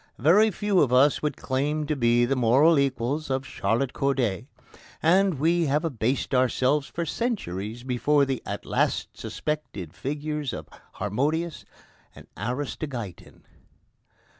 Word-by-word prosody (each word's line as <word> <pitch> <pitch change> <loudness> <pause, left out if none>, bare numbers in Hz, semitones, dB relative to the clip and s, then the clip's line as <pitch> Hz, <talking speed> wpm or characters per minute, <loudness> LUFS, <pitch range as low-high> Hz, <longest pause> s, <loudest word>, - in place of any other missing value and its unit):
Very 185 - +5
few 205 -1 +1
of 130 - +2
us 135 +3 +4
would 150 - -2
claim 145 +3 -1
to 150 +1 -1
be 120 -2 +3
the 135 +3 0
moral 135 +6 +4
equals 140 +2 -1
of 130 0 -1
Charlotte 120 +4 -1
Corday, 130 -6 0 0.5
and 185 +2 +3
we 165 +4 +2
have 150 +4 +1
abased 130 -2 -1
ourselves 130 +3 +2
for 170 - -4
centuries 120 - -3
before 140 +3 +2
the 135 -2 -2
at - - -6
last - - 0
suspected 130 - -5
figures 150 +2 -3
of - - -7 0.3
Harmodius 150 - -2 0.5
and - - -13
Aristogeiton. 125 - -5
140 Hz, 130 wpm, -26 LUFS, 120-155 Hz, 0.5 s, Very